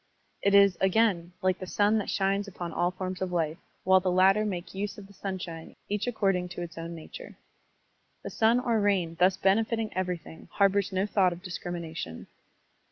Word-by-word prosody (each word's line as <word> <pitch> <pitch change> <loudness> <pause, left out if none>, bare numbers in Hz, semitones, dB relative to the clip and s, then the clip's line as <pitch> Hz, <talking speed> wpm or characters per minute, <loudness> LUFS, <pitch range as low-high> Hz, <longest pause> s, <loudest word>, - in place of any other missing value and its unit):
It 200 0 +3
is, 200 -2 +6
again, 190 -3 +2
like 185 -1 +1
the 185 - -6
sun 210 +3 +2
that 205 - -4
shines 195 +1 0
upon 175 -3 -6
all 175 - +1
forms 185 0 -5
of 185 -1 -2
life, 165 -1 -1 0.2
while 190 0 +5
the 185 0 -1
latter 190 +3 +4
make 180 -4 -4
use 200 +1 -4
of 205 - -10
the 200 - -17
sunshine 180 -5 -6
each 210 +2 -1
according 195 -6 0
to 175 - -3
its 170 -1 -8
own 165 0 -6
nature. 335 - -10 0.9
The - - -6
sun 230 +2 +3
or 235 -3 +1
rain 190 -5 +1
thus 185 +1 +4
benefiting 220 +3 +1
everything 180 -3 -4
harbors 200 0 +2
no 190 +1 0
thought 190 -4 +2
of 175 +1 -12
discrimination. 170 - -6
190 Hz, 180 wpm, -28 LUFS, 175-200 Hz, 0.9 s, is